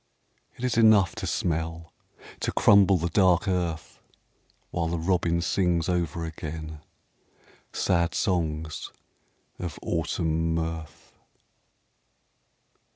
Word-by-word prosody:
It 120 - -9
is 125 -2 0
enough 110 -6 +5
To - - -4
smell, 80 0 -2 0.5
to - - -1
crumble 100 -2 +5
the 85 +1 -2
dark 90 0 +3
earth. 90 -4 -2 0.7
While 85 -2 -1
the 85 +1 -2
robin 85 0 +1
sings 85 -2 +1
over 85 -2 -1
again 80 -1 -7 0.9
Sad 85 -1 0
songs 80 -4 -2 0.7
of 85 -4 -5
Autumn 80 0 -1
mirth. 80 -1 -5
85 Hz, 95 wpm, -26 LUFS, 80-90 Hz, 0.9 s, enough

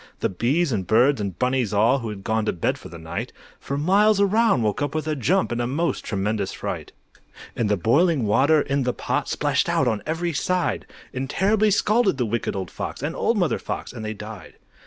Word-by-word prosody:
The - - +1
bees 135 - +1
and 95 -5 -2
birds 125 +3 +4
and 100 -3 -4
bunnies 125 -4 0
all, 115 +7 +4
Who 115 -3 -5
had 100 -2 -7
gone 110 +1 0
to - - +1
bed 85 - -1
for - - -11
the 85 - -9
night, 80 0 -5 0.3
For 140 - -4
miles 200 +7 +3
around, 200 - +3
woke 105 +3 -1
up 145 +1 -2
with 155 0 -2
a 155 - 0
jump 175 - +1
In 120 0 -1
a 120 - -1
most 160 +7 -1
tremendous 100 -1 -2
fright. - - -5 0.6
And 110 -3 0
the 105 - +2
boiling 140 - +2
water 135 +9 +4
in 140 0 -1
the 125 -1 0
pot - - -2
Splashed - - 0
out 135 - +2
on 110 -3 0
every 165 +2 -1
side, 180 +5 -1 0.3
And 130 0 -3
terribly 210 +5 +2
scalded 205 - +2
the 125 - 0
Wicked 115 -1 -2
Old 95 -3 -4
Fox, - - -6
And - - -2
Old - - +1
Mother - - +1
Fox, - - -5
and 110 - -7
they 110 0 -4
died. 105 +1 -10
130 Hz, 220 wpm, -23 LUFS, 110-165 Hz, 0.6 s, birds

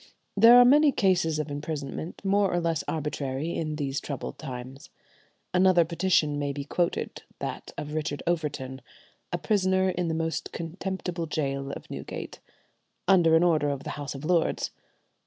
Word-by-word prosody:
There 230 +4 +8
are 245 - +9
many 290 +3 +6
cases 180 - +2
of 155 -1 -3
imprisonment 150 +4 -5
more 200 0 +3
or 175 - +1
less 165 -3 0
arbitrary 150 0 -2
in 155 -2 -2
these 140 -2 -2
troubled 140 -3 -6
times. 130 -1 -8 0.6
Another 180 -2 +5
petition 165 -3 +1
may 145 -1 -1
be 140 0 -5
quoted, 170 +4 -1 0.2
that - - -5
of 150 0 -5
Richard 150 -2 -3
Overton, 145 -6 -2 0.5
"a - - 0
prisoner 190 -3 +2
in 180 -1 -2
the 160 - -1
most 165 0 -2
contemptible 175 0 -4
gaol 140 -2 -2
of - - -8
Newgate," - - -6 0.7
under 170 -4 +5
an 165 - +5
order 155 -4 +3
of 140 -1 -3
the - - -5
House 145 -1 -5
of 135 +2 -7
Lords. 170 -1 +1
160 Hz, 155 wpm, -27 LUFS, 145-180 Hz, 0.7 s, are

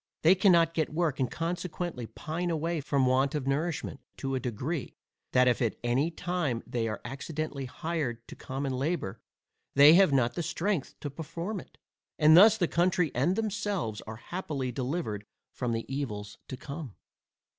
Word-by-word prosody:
They 165 +3 +8
cannot 170 -4 +4
get 160 -2 0
work, 155 -3 0
and 130 -3 +1
consequently 170 -5 -3
pine 170 +8 -4
away 165 0 -1
from 140 -2 +1
want 130 +3 +2
of 145 -3 -2
nourishment, 145 +1 -1 0.2
to 135 -1 -3
a 130 - +1
degree, 130 +5 -3 0.4
that 125 0 +5
if 125 - +2
at 115 -3 +1
any 125 +6 +2
time 170 -8 -2
they 115 -2 -1
are 110 -2 -4
accidentally 140 +2 -4
hired 130 -5 -3
to - - -9
common 135 0 -4
labour, 130 - -2 0.5
they 145 +3 +9
have 185 -2 +6
not 135 +5 +1
strength 175 -3 -1
to 145 - -4
perform 170 +7 -5
it, - - -14 0.4
and 155 0 +7
thus 210 +4 +8
the 175 -5 +2
country 175 -2 +2
and 145 +10 +2
themselves 205 - -2
are 110 - -5
happily 140 -1 -4
delivered 125 - -3 0.3
from 125 -2 -2
the 115 0 -2
evils 105 -7 -4
to 130 - -6
come. 140 -4 -7
145 Hz, 165 wpm, -29 LUFS, 125-170 Hz, 0.5 s, they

